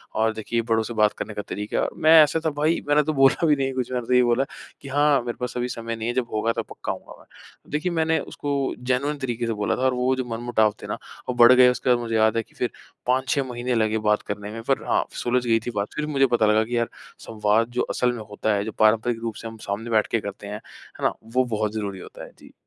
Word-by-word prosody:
और 110 +1 +2
देखिए 115 +2 -2
बड़ों 110 0 +3
से 120 - -6
बात 105 -1 +3
करने 105 - -5
का 105 - -4
तरीका"। 105 +1 -2
मैं 155 - +4
ऐसा 155 +2 0
था 160 - +3
भाई 160 +3 +2
मैंने 150 +1 +4
तो 155 +2 -1
बोला 135 +3 +4
भी 150 - +5
नहीं 135 -1 -1
कुछ, 130 -1 -3
मैंने 125 -2 -2
तो - - +1
यही 125 0 +6
बोला 120 +2 +2 0.4
कि, 140 - -10
"हाँ, 145 -1 +3
मेरे 120 - -4
पास 125 -1 -3
अभी 125 0 -1
समय 115 -1 -4
नहीं 110 0 -4
है, 120 - 0
जब 125 -1 -1
होगा 110 +2 +1
तो - - -2
पक्का - - -6
आऊँगा - - -9
मैं"। - - -20
देखिए, 155 +5 -1
मैंने 160 -1 +1
उसको 145 - -5 0.4
जेनुइन 140 +4 0
तरीके 120 -4 -3
से 115 - 0
बोला - - +1
था, - - -5
और 130 0 +2
वो 125 +1 +1
जो 130 -1 -3
मनमुटाव 115 -3 +1
थे - - -6
ना - - -3 0.3
वो - - +1
बढ़ 120 0 +8
गए, 125 0 +7
उसके 125 0 -1
बाद 125 -1 +4
मुझे 115 -1 -3
याद 110 +1 +3
है 115 - +1
कि - - -28
फिर 125 - -2 0.4
5-6 130 +2 +1
महीने 120 +1 -2
लगे 110 -1 +1
बात 105 - +3
करने 105 0 -5
में, 115 +1 -6
पर 135 +3 0
हाँ, - - +2 0.2
सुलझ 125 +1 +1
गई 115 -1 +3
थी 120 - -1
बात। 100 0 -2
फिर 150 - -2
मुझे 135 0 +4
पता 110 - +3
लगा 105 +1 +4
कि 120 +2 -3
यार 115 0 0 0.4
संवाद 110 +1 +1
जो - - +4
असल 125 0 +2
में 115 -3 -6
होता 105 +1 -1
है, 100 - 0
जो 110 - -4
पारंपरिक 110 +2 +3
रूप 115 -2 -4
से 115 - -6
हम 115 - -9
सामने 105 +4 -3
बैठ 110 -2 +2
के 115 - +2
करते 100 0 -7
हैं, 105 - -5 0.4
है - - -8
ना, - - +2
वो 125 +3 +1
बहुत 105 0 -1
ज़रूरी 100 -3 -4
होता - - -10
है। - - -11
जी। - - -16
120 Hz, 270 wpm, -24 LUFS, 110-130 Hz, 0.4 s, बढ़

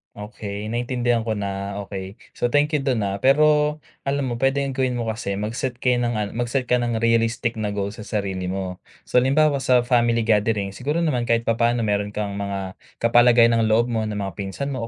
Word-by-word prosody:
Okey, 105 0 -6
naintindihan 120 -1 0
ko 110 - 0
na, 100 -1 -4
okey. 95 0 -7 0.2
So - - -1
thank 145 +4 +2
you 150 - +1
do'n 130 -5 0
ha. 100 - -1
Pero, 150 +3 +4 0.3
alam 140 -2 0
mo 120 - -4
pwedeng 135 +1 +1
gawin 130 -1 -1
mo 120 - -2
kasi 105 -3 -4
mag-set 115 +5 -3
kayo 125 0 +1
ng 120 0 0
an 105 -1 -1
mag-start 120 +2 -2
ka 125 - +4
ng 120 -2 -1
realistic 115 0 +1
na 105 - -1
goal 100 0 -2
sa 110 - -13
sarili 95 -3 -2
mo. 95 -1 -4 0.2
So 125 - +2
halimbawa 140 +3 +3
sa 125 -2 +3
family 120 -2 +2
gathering, 105 -2 +1
siguro 145 - -2
naman 125 -7 0
kahit 115 0 +2
papaano 115 +1 +1
meron 105 -1 -1
kang 105 -1 -2
mga 100 -2 -5 0.2
kapalagayan 115 0 +5
ng 110 - +2
loob 115 +3 +2
mo 110 -2 -1
na 105 - -4
mga 100 -3 -5
pinsan 100 +9 -4
mo 125 -4 -4
115 Hz, 200 wpm, -22 LUFS, 105-125 Hz, 0.3 s, kapalagayan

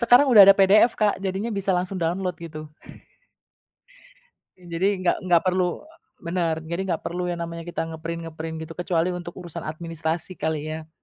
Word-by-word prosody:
Sekarang 245 +4 +6
udah 210 - +10
ada 195 - +9
PDF, 205 +4 +6
Kak, 210 -2 +3
jadinya 195 +4 -2
bisa 200 -1 -1
langsung 180 +2 -2
download 180 +2 -1
gitu. 155 -2 -8 1.9
Ya 180 - -18
jadi, 175 +4 +1 0.2
nggak - - +4
nggak 170 -2 +5
perlu 185 - 0 0.3
bener, 170 -1 -1
jadi 170 +3 -3
nggak 165 - -1
perlu 180 +1 -2
yang 175 - -3
namanya 170 0 -7
kita 170 -1 -4
nge-print-nge-print 165 0 -6
gitu, 165 - -10
kecuali 175 0 0
untuk 175 -1 -7
urusan 175 -4 -7
administrasi 165 +2 -4
kali 160 -3 -3
ya. 160 0 -8
175 Hz, 165 wpm, -24 LUFS, 165-185 Hz, 1.9 s, udah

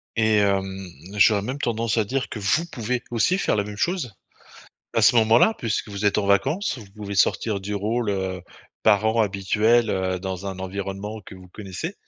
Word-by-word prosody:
Et 110 -1 +3
hem, 95 -1 0 0.3
j'aurais 105 0 +5
même 130 +7 -4
tendance 115 -2 -1
à 110 - +3
dire 130 +4 -2
que 110 - -6
vous 130 +12 +1
pouvez 120 +1 -2
aussi 150 - +2
faire 195 - +1
la 100 - +1
même 105 0 -8
chose 170 - -1 0.8
à 115 - +2
ce 120 - +6
moment-là 115 - +5
puisque 110 -2 -2
vous 100 0 -5
êtes 105 - +3
en 100 - 0
vacances. 135 - +1
Vous 100 -3 -12
pouvez 100 -1 -6
sortir 100 +1 +1
du 105 +2 -4
rôle, 110 +2 -1
heu, 95 -2 -3 0.4
parent 110 +2 +3
habituel, 105 +3 +2
heu, 95 -1 -1
dans 95 +1 -5
un 95 -1 -5
environnement 100 +3 -5
que - - -11
vous 90 -1 -14
connaissez 105 - -6
105 Hz, 190 wpm, -23 LUFS, 100-115 Hz, 0.8 s, ce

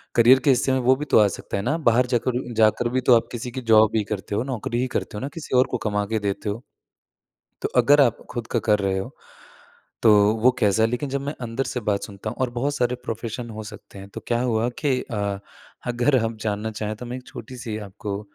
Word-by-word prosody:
Career 120 +3 +7
के - - +5
हिस्से 130 0 +3
में 130 - +2
वो 130 +1 +4
भी 150 - -4
तो - - +6
आ 105 - +6
सकता 100 - -5
है 100 - -3
ना 145 +8 0
बाहर 125 +2 +3
जाकर 125 0 -1
जाकर 110 +2 +3
भी 130 +1 0
तो 125 -1 +6
आप 115 - +1
किसी 125 +1 -5
की 130 +2 -5
जॉब 110 -1 +6
ही 110 - +2
करते 100 0 -4
हो 110 - 0
नौकरी 120 -2 -3
ही 130 - 0
करते 105 - -5
हो - - -5
ना 135 - -3
किसी 160 -5 -4
और 130 - +5
को 125 - 0
कमा 105 -1 0
के 110 +1 -1
देते 100 +1 -3
हो। 110 +4 -4 1.0
तो - - 0
अगर 145 +1 +6
आप 120 -5 +3
खुद 120 -2 -5
का - - +3
कर 105 -1 +4
रहे 95 -1 0
हो, 95 - -4 0.9
तो 110 - +7 0.3
वो 130 - +7
कैसा 110 -1 +3
है 110 - +3
लेकिन 125 +4 -3
जब 140 +1 -2
मैं 145 - -2
अंदर 120 +2 -2
से 125 - -1
बात 100 -1 0
सुनता 100 +1 -6
हूँ - - -10
और 130 - +1
बहुत 145 +3 0
सारे 125 -1 0
प्रोफेशन 115 +1 -5
हो 110 - -5
सकते 100 - -12
हैं। 100 - -10
तो - - -5
क्या 120 0 +1
हुआ 120 -1 +1
कि 135 -4 +2
अ, 100 -3 -3 0.5
अगर 120 +3 +2
हम 115 0 -4
जानना 105 +1 -2
चाहें 105 0 -2
तो 125 - -8
मैं 120 +1 -5
एक 125 - -13
छोटी-सी 115 -2 -7
आपको 100 0 -5
120 Hz, 250 wpm, -23 LUFS, 105-125 Hz, 1.0 s, Career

